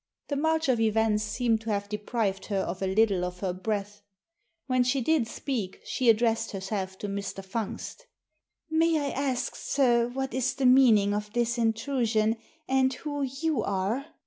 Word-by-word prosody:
The 285 - -1
march 320 +2 +1
of 250 -3 +2
events 220 -1 +2
seemed 220 +1 0
to 225 - -6
have 205 -1 -1
deprived 210 -2 -2
her 200 - -1
of 190 -1 -3
a 190 - 0
little 200 -3 +3
of 180 0 -5
her 185 -3 -1
breath. 205 +2 -3 0.6
When 255 -1 +2
she 250 +2 +1
did 275 -2 +2
speak 230 -7 -4
she 250 -2 +1
addressed 225 0 +2
herself 190 -1 -4
to 205 - -5
Mr. 200 -1 -5
Fungst 230 - -5 0.3
" - - -58
May 330 -1 +3
I 285 -1 -2
ask, 265 -3 -2
sir, 240 -4 +2
what 265 0 -4
is 260 -1 0
the 270 - -1
meaning 235 -6 +6
of 210 0 -3
this 240 0 0
in 225 -1 +3
trusion, 225 -2 0 0.3
and 260 0 +3
who 290 +2 -4
you 275 +3 -1
are?" 200 +9 -1
225 Hz, 175 wpm, -28 LUFS, 205-260 Hz, 0.6 s, meaning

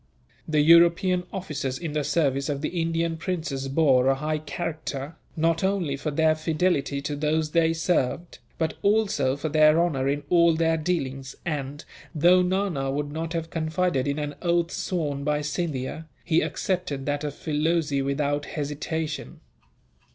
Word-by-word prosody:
The 155 -1 +2
European 170 +3 +5
officers 145 -9 -3
in 160 -2 -5
the 150 -1 0
service 140 -2 0
of 140 -1 -2
the 170 +2 -2
Indian 165 0 -1
princes 160 -6 -3
bore 135 -3 +3
a 135 - +4
high 155 +2 -2
character, 155 -2 -5 0.2
not 165 +1 +1
only 190 -7 0
for 145 +3 -3
their 155 +2 +3
fidelity 155 -3 0
to 145 0 -2
those 155 +1 0
they 165 0 +3
served, 165 -1 -1 0.2
but 160 -1 -1
also 200 -11 +2
for 150 - -3
their 155 +1 +5
honour 145 -6 +1
in 145 +1 -1
all 170 0 +4
their 165 0 +2
dealings 135 -6 -3
and, 145 -3 -4 0.3
though 175 +4 +5
Nana 180 -7 0
would 145 +1 -2
not 160 +2 -4
have 165 -1 -3
confided 160 -3 0
in 140 +1 -1
an 145 -1 -3
oath 170 -1 +1
sworn 145 -6 -2
by 150 0 0
Scindia, 150 0 -3 0.2
he 160 - +2
accepted 180 -8 -2
that 145 0 -1
of 145 -1 -4
Filoze 155 -2 0
without 145 +1 -1
hesitation. 150 - -4
155 Hz, 155 wpm, -25 LUFS, 145-170 Hz, 0.3 s, European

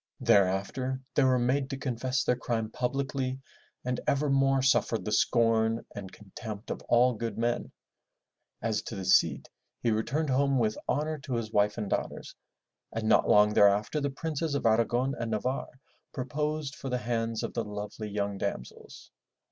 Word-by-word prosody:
Thereafter 105 +6 +2
they 145 - +3
were 130 -1 +4
made 130 +2 +1
to 135 - -4
confess 130 0 -1
their 125 - +2
crime 115 -3 -2
publicly 135 +1 -2 0.5
and 125 0 -1
ever 140 +1 +2
more 135 -1 +3
suffered 125 -3 +2
the 105 - -2
scorn 115 +1 +2
and 95 -2 -7
contempt 105 +1 -8
of - - -4
all 125 +1 +5
good 115 -1 -4
men. 120 +1 -1 0.9
As 110 -2 0
to 115 - -7
the 95 -1 -5
Cid, 80 -6 +3 0.3
he 115 - +1
returned 135 +7 0
home 140 +1 +2
with 110 -3 +1
honor 155 +1 -1
to 135 -3 -4
his 115 -2 -3
wife 105 0 +2
and 105 -3 -3
daughters - - -3 0.6
and 110 -1 -3
not 110 - +4
long 105 0 +6
thereafter 105 +9 +4
the 140 - 0
Princes 155 +1 -3
of 140 - -2
Aragon 120 +4 +2
and 115 -1 -2
Navarre 125 +4 -3 0.3
proposed 150 +2 -2
for 135 - -6
the 125 - 0
hands 115 -2 -2
of - - -4
the 115 - -1
lovely 105 +1 -6
young 100 -1 -2
damsels. 60 - -6
120 Hz, 165 wpm, -29 LUFS, 110-135 Hz, 0.9 s, long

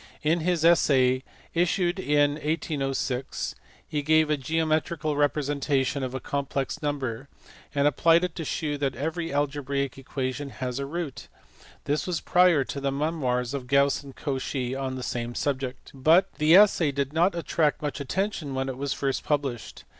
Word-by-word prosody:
In 160 +3 +2
his 165 -1 +1
Essai, 130 -6 +4 0.3
issued 175 +1 +1
in 145 -4 +3
1806, 145 -4 -2 0.3
he 150 - -2
gave 155 +1 +3
a - - +4
geo 160 +4 -1
metrical 155 0 0
representation 145 -1 0
of 130 0 -3
a - - -2
complex 140 +2 -3
number, 140 -4 -3 0.5
and 140 0 +3
applied 165 +4 +4
it 180 -2 -1
to 165 - -3
shew 150 -1 -2
that 135 -2 -1
every 160 +5 -3
algebraic 140 -1 -1
equation 135 +1 -4
has 130 -1 -4
a 140 - -3
root: 160 -3 -5 0.6
this 150 +5 -1
was 175 -3 -1
prior 175 -5 +4
to 140 - -6
the 140 0 0
memoirs 135 -4 -1
of 135 -3 -4
Gauss 140 +1 +3
and 140 -2 -12
Cauchy 130 -2 -3
on 135 -1 -3
the 130 - -5
same 120 0 -3
subject, 135 -2 -3
but 160 +8 +4
the 155 +3 +6
essay 190 -6 +6
did 140 0 -2
not 175 +3 +3
attract 160 -3 0
much 145 -1 -3
attention 155 -1 -2
when 135 0 -1
it 130 0 -6
was 140 0 -1
first 135 -1 -2
published. 135 -8 -2
145 Hz, 165 wpm, -26 LUFS, 135-160 Hz, 0.6 s, the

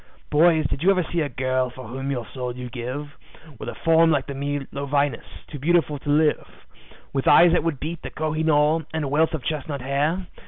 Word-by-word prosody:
"Boys, 160 0 +4
did 135 - -2
you 185 - +4
ever 185 -2 +3
see 170 - +1
a 145 - -1
girl 130 0 -1
for 130 -1 -10
whom 135 +4 -5
your 125 -4 -2
soul 125 -2 -4
you'd 125 -1 -7
give, 130 +4 -5 0.5
With - - -5
a - - -7
form 165 0 +4
like 140 -4 +1
the 140 - -6
Milo 140 0 -4
Venus, 140 -3 -2
too 145 - -9
beautiful 155 -1 +1
to 145 - -7
live; 150 +1 +1 0.5
With 135 -1 -1
eyes 175 0 +7
that 175 - +2
would 165 -5 -1
beat 165 +2 -5
the - - -6
Koh 155 0 -3
i 155 - -1
noor, 155 +1 +3
and 160 - -1
a - - -2
wealth 160 +4 +2
of 145 - -7
chestnut 145 -2 -3
hair? 145 +8 -1
145 Hz, 225 wpm, -23 LUFS, 135-160 Hz, 0.5 s, eyes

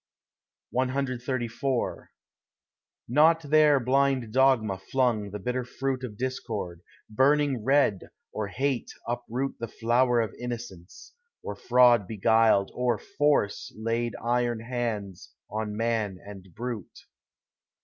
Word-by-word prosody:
CXXXIV 130 -1 -2 1.0
Not 160 +6 +4
there 150 -1 +5
blind 130 -2 +1
dogma 125 -7 +3
flung 115 -1 0
the 105 - -5
bitter 125 +5 -2
fruit 130 +1 -3
Of 110 -5 -6
discord, 110 -9 -4 0.3
burning 135 +1 +2
red, 135 -7 +2 0.2
or 105 -1 -3
hate 135 +3 -2 0.2
uproot 120 +3 -3
The 115 - -4
flower 120 +2 +2
of 110 -2 -1
innocence, 115 -8 -8 0.3
or 105 - -5
fraud 120 -2 +4
beguiled, 110 -1 +3
Or 125 -2 0
force 145 -3 0
laid 115 +1 -1
iron 120 -1 0
hands 115 -6 -4 0.2
on 105 -1 -3
man 110 -4 -1
and 100 -2 -10
brute. 115 +1 -6
120 Hz, 110 wpm, -27 LUFS, 110-130 Hz, 1.0 s, there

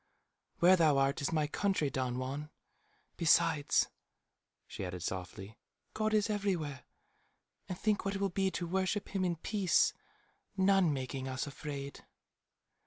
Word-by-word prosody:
"Where 180 +2 +6
thou 155 -5 +4
art 135 +2 +1
is 140 - -1
my 155 -2 +1
country, 155 -2 0
Don 125 -2 -2
Juan. 140 +4 -4 0.7
Besides," 165 -3 +3 0.8
she - - -7
added 90 -1 -5
softly, 95 +4 -6 0.3
"God 215 0 0
is 210 0 +3
everywhere. 185 - -2 0.8
And 180 - -4
think 210 0 0
what 195 +1 -2
it - - -3
will 200 0 +1
be 190 +1 +1
to 175 -1 -3
worship 190 +3 -1
him 195 -1 -1
in 175 -2 +1
peace, 190 +2 +2 0.6
none 190 -3 +4
making 130 -1 -3
us 130 0 -2
afraid." 140 -1 -7
160 Hz, 140 wpm, -33 LUFS, 135-190 Hz, 0.8 s, Where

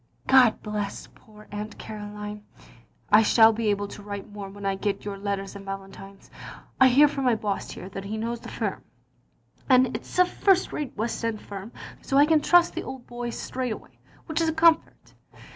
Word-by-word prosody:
God 250 - +5
bless 210 -2 -4
poor 215 -1 -18
Aunt 210 +1 -6
Caroline. 210 0 -7 0.7
I 210 +1 +8
shall 225 +1 +6
be 220 0 -1
able 205 0 0
to 205 - -10
write 200 0 -7
more 205 -1 -7
when 200 0 -9
I 195 - +1
get 200 +1 -3
your 205 -1 -4
letters 195 0 -4
and 200 - -8
Valentine^s. 195 0 -9 0.5
I 260 - +8
hear 275 +4 +6
from 275 -2 -3
my 245 -2 +4
boss 205 -2 -3
here 185 - -8
that 195 0 -7
he 215 +2 -4
knows 230 +2 -3
the - - -10
firm, - - -3 0.9
and 255 -1 +4
it - - -3
*s - - -10
a 365 - +6
first 375 +1 +2
rate 290 -7 -5
west 230 +2 -2
end 225 -2 -1
firm, 200 +2 -9 0.3
so 275 - 0
I 285 - +7
can, 310 -1 +3
trust 350 +3 +4
the - - -3
old 265 -2 -8
boy 240 0 -5
straight 250 0 -3
away, - - -13 0.3
which 320 0 -1
is 325 - +2
a - - -1
comfort. 325 0 +2
215 Hz, 200 wpm, -26 LUFS, 200-260 Hz, 0.9 s, I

